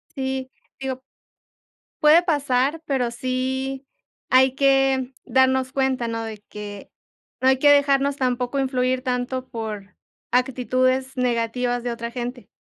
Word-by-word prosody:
Sí, 265 -1 -3 0.3
digo 265 -1 -4 1.0
puede 310 +3 +7
pasar, 285 -1 +1
pero 250 -4 0
sí, 260 +2 -3 0.5
hay 260 0 +5
que 270 -1 +2
darnos 260 0 +2
cuenta, 265 -3 0
¿no?, 230 0 -3
de 220 -2 -7
que, 205 -1 -8 0.5
no 260 - +3
hay 265 0 +4
que 290 - +5
dejarnos 280 -1 +4
tampoco 250 +1 -1
influir 255 -1 0
tanto 255 0 -2
por 215 -3 -6 0.4
actitudes 255 +1 +1
negativas 245 0 0
de 245 - -2
otra 235 0 -5
gente. 245 0 -6
255 Hz, 125 wpm, -23 LUFS, 245-265 Hz, 1.0 s, puede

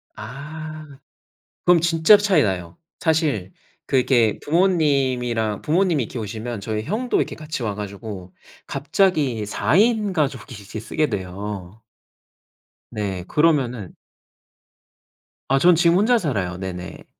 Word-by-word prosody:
아. 155 +6 -8 0.8
그럼 175 -1 +6
진짜로 170 +5 +5
차이 190 -8 +3
나요. 90 -3 -3 0.2
사실 150 - 0 0.3
그 135 - +1
이렇게 120 -4 +3
부모님이랑 135 - +1
부모님이 165 -4 +2
이렇게 120 +2 -6
오시면 110 +1 -5
저희 110 0 -3
형도 230 - -1
이렇게 - - -1
같이 155 -5 -5
와 105 -2 -2
가지고 100 -2 -7 0.3
갑자기 140 - +1
4 105 +7 0
인 215 -2 +3
가족이 145 -3 -2
이제 105 +1 -8
쓰게 150 +8 -1
돼요. 100 +1 -6 1.1
네 95 -4 -3
그러면은 130 - +1 1.5
아 135 +1 +3
전 175 +2 +6
지금 170 +1 +4
혼자 235 +4 +4
살아요 95 - -2
네네. 90 -1 -7
130 Hz, 255 characters per minute, -22 LUFS, 105-160 Hz, 1.5 s, 그럼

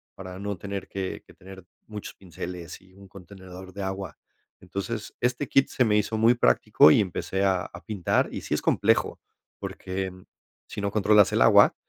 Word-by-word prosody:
para 95 -1 -9
no 100 -1 -4
tener 100 +1 -6
que 95 -1 -5
que - - -18
tener 95 0 -13 0.2
muchos 105 -1 -8
pinceles 90 -1 -8
y 95 0 -22
un 100 +1 -15
contenedor 95 0 -12
de 100 - -6
agua, 95 -4 -5 0.4
entonces, 100 +4 -6
este 125 +3 0
kit 135 - +3
se 125 - +1
me 105 -1 +3
hizo 105 +1 -1
muy 115 +2 +5
práctico 100 -8 +5
y - - +5
empecé 95 0 -2
a 95 -2 +1
a 85 - -10
pintar, 100 -6 0
y - - -5
sí - - -4
es - - 0
complejo, - - +1 0.4
porque, 95 +1 -4
em, 90 0 -12 0.4
si - - -6
no 100 0 -1
controlas 105 -1 +4
el - - +2
agua, - - +6
95 Hz, 185 wpm, -26 LUFS, 95-105 Hz, 0.4 s, agua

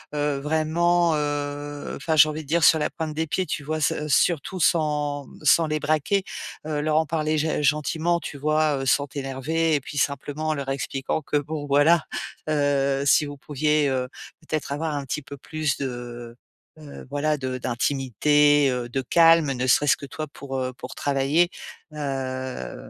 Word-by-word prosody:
heu, 145 -1 0
vraiment, 160 +3 +2
heu, 145 0 -3
enfin 160 +3 -1
j'ai 155 0 +7
envie 155 +1 -5
de - - -18
dire 165 +3 +1
sur 160 0 +6
la 150 - 0
pointe 160 -1 -5
des 160 +1 -2
pieds. 185 +4 -1
Tu 150 -2 -4
vois? 155 +1 -2
S 150 - +2
heu, 150 - -3
surtout 165 +4 +1
sans, 150 -3 +1
mmh, - - -15
sans 160 +2 +5
les 155 0 -1
braquer, 155 +6 +1 0.4
heu, 155 -1 -2
leur 155 0 0
en 160 - +3
parler 155 0 -1
g 155 0 0
gentiment. 155 +4 +1
Tu 145 - -7
vois? 155 0 +1
Heu, - - -3
sans 140 +1 +2
t'énerver 145 +3 -1
et 145 - 0
puis 145 +2 -8
simplement 145 +2 -1
en - - +2
leur 140 -2 -4
expliquant 135 +2 -2
que 150 - -4
bon 145 +1 -4
voilà, 145 +4 +4 0.4
heu, 140 -2 +1
si 150 - +4
vous 145 0 -7
pouviez, 150 +1 +1
heu, 130 -1 -1 0.3
peut-être 155 -2 -4
avoir 150 +1 -2
un 145 - -3
petit 145 +3 -3
peu 140 0 -10
plus 155 0 -2
de, 120 -2 -6 0.4
heu, 150 -2 -11
voilà 150 +2 0
de 130 -2 -3
d'intimité, 140 +3 +2
heu, 125 -1 -3
de 135 +2 -1
calme 165 +2 +5
ne 130 -1 -2
serait-ce 140 +3 +4
que - - -8
toi 155 +3 -6
pour, 135 -1 -7
heu, 130 0 -2
pour 125 0 -9
travailler, 145 +5 +2 0.4
heu, 130 - -4
145 Hz, 185 wpm, -24 LUFS, 140-155 Hz, 0.4 s, j'ai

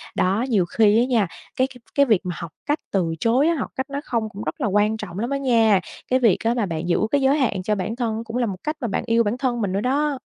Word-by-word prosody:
Đó, 200 +7 +1
nhiều 200 -6 +3
khi 215 +4 +3
á 240 - +3
nha, 235 -6 +2 0.3
cái 260 - +2
cái 260 -2 -15 0.2
cái 280 - +5
việc 220 -8 +3
mà 180 -1 -3
học 170 -2 -7
cách 295 +1 0
từ 175 -4 0
chối 250 - +3
á, 335 - +2
học - - -3
cách 265 +1 -3
nói 280 +1 -4
không 230 -5 -2
cũng 205 +1 -8
rất - - -5
là - - +1
quan 210 +2 +2
trọng 195 -3 -7
lắm 235 - -2
á 280 - 0
nha. 230 -7 +3 0.3
Cái 255 +1 +3
việc 225 -7 +4
á 230 +1 +2
mà 235 -3 0
bạn 165 -1 -4
giữ 170 - +2
cái 285 -1 +2
giới 270 +3 +3
hạn 215 -9 0
cho 210 +3 0
bản 205 +4 -3
thân 230 -2 -2
cũng 230 +1 -5
là 245 - +1
một 190 -4 -5
cách 305 +1 -2
mà 240 - -1
bạn 195 - -2
yêu 230 0 +3
bản 215 +4 -1
thân 245 -3 -1
mình 195 -3 -1
nữa 200 +2 -1
đó. 280 +1 0
230 Hz, 295 wpm, -22 LUFS, 200-260 Hz, 0.3 s, cái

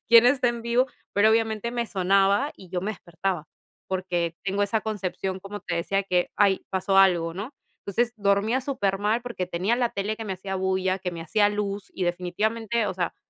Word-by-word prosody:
quién 235 0 +8
está 250 0 +4
en 235 -1 -3
vivo? 235 +2 +2 0.3
Pero 205 +2 +5
obviamente 225 0 +1
me 240 -1 -1
sonaba 195 +6 +2
y 185 - -13
yo 180 - -1
me 210 +4 -2
despertaba, 175 -3 -3 0.4
porque 175 -3 -1
tengo 200 +1 0
esa 210 +2 +1
concepción, 190 -3 -3
como 200 +1 -7
te 170 - -3
decía 195 +3 0
que: 180 -2 +1
"¡Ay! 200 -2 +3
Pasó 190 +1 0
algo", 175 -4 +4
¿no? 205 +7 -5 0.3
Entonces, 235 +4 0
dormía 205 +5 +2
supermal 210 -4 0
porque 235 -7 -4
tenía 185 +6 0
la 245 -1 +2
tele 200 +1 -2
que 225 - -6
me 195 -2 -3
hacía 190 +1 -5
bulla, 190 0 0
que 180 -1 -2
me 170 -1 -6
hacía 205 +5 +3
luz 205 -1 -3
y 185 - -2
definitivamente, 210 +6 -1
o 190 - -2
sea, 175 -1 -2
195 Hz, 195 wpm, -26 LUFS, 185-220 Hz, 0.4 s, quién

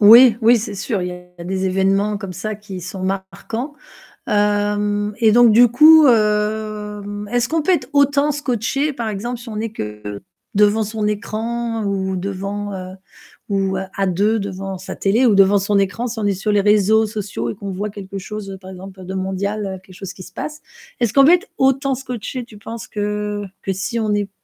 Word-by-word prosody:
Oui. 230 +2 +9
Oui, 235 +2 +6
c'est 210 -1 -5
sûr, 195 -1 -2
il 180 - -2
y - - -5 0.3
a - - -7
des 190 +1 -1
événements, 195 +2 +1
comme 195 -2 -6
ça, 210 +4 -4
qui 200 -3 -8
sont 185 +2 -7
marquants. 195 +8 -4 0.5
Hem, 205 0 +1
et 220 -2 +5
donc 240 0 +6
du 240 +3 +7
coup 310 +5 +7
hem, 210 -2 0
est-ce 240 -1 +1
qu'on 325 0 +1
peut 375 - +2
être 270 -8 0
autant 285 +1 +3
scotché, 275 +1 -1
par 235 -4 -3
exemple, 230 +4 -4
si 235 0 -10
on 215 - -5
est 225 0 -3
que 105 - -6 0.3
devant 210 +2 +4
son 215 0 -2
écran 225 +2 -2
ou 190 -1 -1
devant 200 +2 -4
heu, 185 0 -7 0.5
ou, 195 -1 0
heu, - - -3
à 195 - +1
deux, 205 +5 +1
devant 195 -1 -5
sa 190 - -7
télé 220 +6 +2
ou 230 - +5
devant 195 +1 +5
son 200 +1 +1
écran, 200 +5 -1
si 230 -1 -5
on 210 - -1
est 200 - +2
sur 195 +3 -2
les 205 -1 +3
réseaux, 210 +2 +4
sociaux 205 - -4
et 115 - -4
qu'on 200 -1 -6
voit 200 +3 -3
quelque 200 -1 -8
chose, 200 +1 -7
heu, 190 - -7
par 190 0 -11
exemple, 190 0 -10
de 185 +1 -6
mondial, 195 +2 -2
heu, 190 -1 -5
quelque 185 -1 -17
chose 195 -1 -7
qui - - -12
se - - -13
passe? 300 0 -6 0.4
Est-ce 235 -4 +1
qu'on 275 -1 +7
peut 325 - +7
être 360 +4 +2
autant 270 0 +2
scotché, 250 -1 -5
tu 220 -4 -14
penses 225 +2 -7
que 210 0 -3 0.2
que 195 - -1
si 190 +5 -3
on 215 -2 0
est 205 -1 -1
210 Hz, 210 wpm, -19 LUFS, 195-230 Hz, 0.5 s, Oui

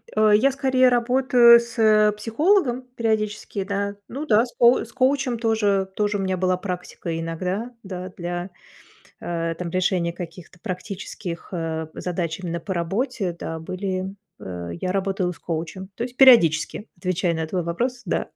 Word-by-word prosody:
Э, 215 0 +4
я 270 +6 +4
скорее 260 -1 +3
работаю 245 -1 +6
с 215 -3 +3
психологом 255 - +2
периодически, 215 -3 -1
да. 200 +1 -2
Ну 280 +5 -5
да, 225 -3 +4
с 240 - -14
коу 240 +1 +6
с 230 - -17
коучем 260 -1 +1
тоже 205 -4 +1
тоже 210 -1 0
у 195 - -2
меня 190 -1 -1
была 185 0 +1
практика 180 -3 -5
иногда, 180 +8 -3
да, 185 -1 -6
для, 175 +1 -4 0.7
э, 165 -1 -2
там, 175 -2 -4
решения 180 -2 0
каких-то 175 0 -9
практических, 185 -3 -6
э, 160 -2 -3
задач 175 -2 -3
именно 170 -2 -4
по 190 +3 -4
работе, 190 +1 -2
да, 160 -1 -5
были 185 +3 -4 0.2
Э, 90 -2 -6
я 185 - 0
работала 195 -2 -1
с - - -15
коучем, 170 +3 -5
то 230 - -5
есть 250 0 -9
периодически 210 - +5
отвечаю 180 -1 0
на 160 0 -2
твой 180 +2 -2
вопрос. 245 +10 -2
Да. - - -1
195 Hz, 155 wpm, -23 LUFS, 175-235 Hz, 0.7 s, работаю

